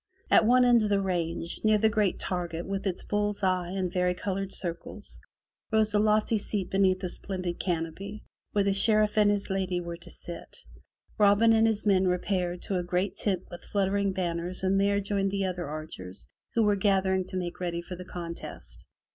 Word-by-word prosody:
At 220 - +6
one 250 +1 +6
end 240 -2 +5
of 210 - 0
the 200 -1 +3
range, 170 -3 -2
near 215 -1 +5
the 220 +1 +3
great 210 -3 +1
target 175 -2 -3
with 195 +1 -3
its 180 - -2
bull's 205 0 -1
eye 185 -2 +1
and 185 -1 -2
vari 180 -1 +1
colored 195 0 -3
circles, 170 -2 -5 0.5
rose 220 -1 +3
a 210 - +4
lofty 215 +1 +2
seat 200 -2 -1
beneath 190 -1 +2
a - - 0
splendid 180 -2 -4
canopy, 180 +4 -3 0.3
where 205 - +2
the 200 0 +2
Sheriff 215 +1 +3
and 210 -1 +5
his 205 -1 -1
lady 190 -2 0
were 170 -1 -6
to 170 - -11
sit. 170 - -9 0.6
Robin 210 +2 +5
and 225 0 +4
his 220 -1 0
men 190 -2 +4
repaired 180 -1 -1
to 190 -2 -1
a - - -2
great 180 +3 -1
tent 190 -3 0
with 175 0 -9
fluttering 200 0 0
banners 180 0 -3
and 195 +1 +3
there 200 0 +2
joined 200 -1 0
the 195 0 -1
other 180 -3 -3
archers 145 - -7 0.3
who 230 - +4
were 205 -1 +3
gathering 190 -1 +2
to 185 - -5
make 175 -1 -4
ready 170 -1 -3
for 180 - -7
the 180 - -8
contest. 170 - -8
190 Hz, 195 wpm, -28 LUFS, 180-205 Hz, 0.6 s, At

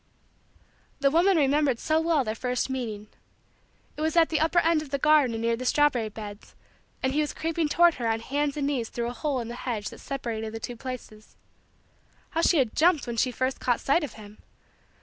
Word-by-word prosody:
The 275 -1 +4
woman 350 +4 +4
remembered 285 -3 +2
so 315 +6 +1
well 325 -4 +2
their 215 -2 -2
first 250 +3 -2
meeting. 220 -5 -4 0.9
It - - -7
was 315 +2 0
at 330 -1 +5
the 320 - 0
upper 325 +3 +1
end 330 -2 +4
of 305 - -9
the 280 - -1
garden 280 -6 +3
near 230 +1 +1
the 245 - -6
strawberry 255 -4 +2
beds 210 -1 -10 0.5
and 260 0 +1
he 300 - +2
was 300 - -3
creeping 325 -1 -1
toward 345 +3 +5
her 230 - 0
on 225 0 0
hands 285 +3 -1
and 285 - -1
knees 260 -6 -1
through 235 0 -3
a - - -6
hole 280 0 -2
in 230 - -6
the 235 - -6
hedge 235 -4 -4
that - - -12
separated 225 -5 -4
the - - -4
two 245 +2 -6
places. 230 -3 -9 1.0
How 330 - 0
she 340 - +4
had 255 -6 +1
jumped 330 -3 +3
when 235 -1 -5
she 255 - +2
first 260 +2 -2
caught 245 -2 +1
sight 295 +5 +2
of 285 - -5
him! 210 -1 -13
265 Hz, 210 wpm, -26 LUFS, 230-305 Hz, 1.0 s, at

